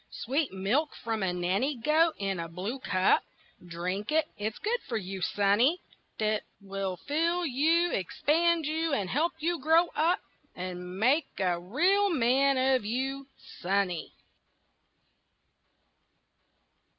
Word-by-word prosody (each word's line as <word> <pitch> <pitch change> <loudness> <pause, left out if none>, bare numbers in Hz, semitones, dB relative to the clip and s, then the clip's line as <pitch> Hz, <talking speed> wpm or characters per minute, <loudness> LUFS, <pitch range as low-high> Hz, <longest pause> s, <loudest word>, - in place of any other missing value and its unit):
Sweet 275 +4 -2
milk 210 +11 0
from 225 -2 -3
a 190 -2 +1
nanny 185 +11 0
goat 310 +6 +3
in 195 -2 -2
a 165 - -4
blue 195 +10 -5
cup 185 -6 +2 0.4
Drink 180 - -4
it, 315 0 +3
it's 215 +1 -4
good 470 +4 -1
for 230 - -1
you, 190 -2 -6
sonny, 205 - +2 0.4
'T 215 -1 +1 0.2
will 195 -2 -4
fill 335 - 0
you, 325 +5 +2
expand 315 - +1
you, 320 +1 -1
and 195 -8 -1
help 330 +6 +1
you 335 +1 -1
grow 325 +4 +4
up, 330 +4 +2 0.4
And 180 0 -6
make 270 +8 +3
a 180 -3 +1
real 355 - +2
man 270 -2 +3
of 260 -2 +2
you, 265 +5 -3 0.3
sonny. 185 -2 -1
250 Hz, 125 wpm, -29 LUFS, 195-315 Hz, 0.4 s, grow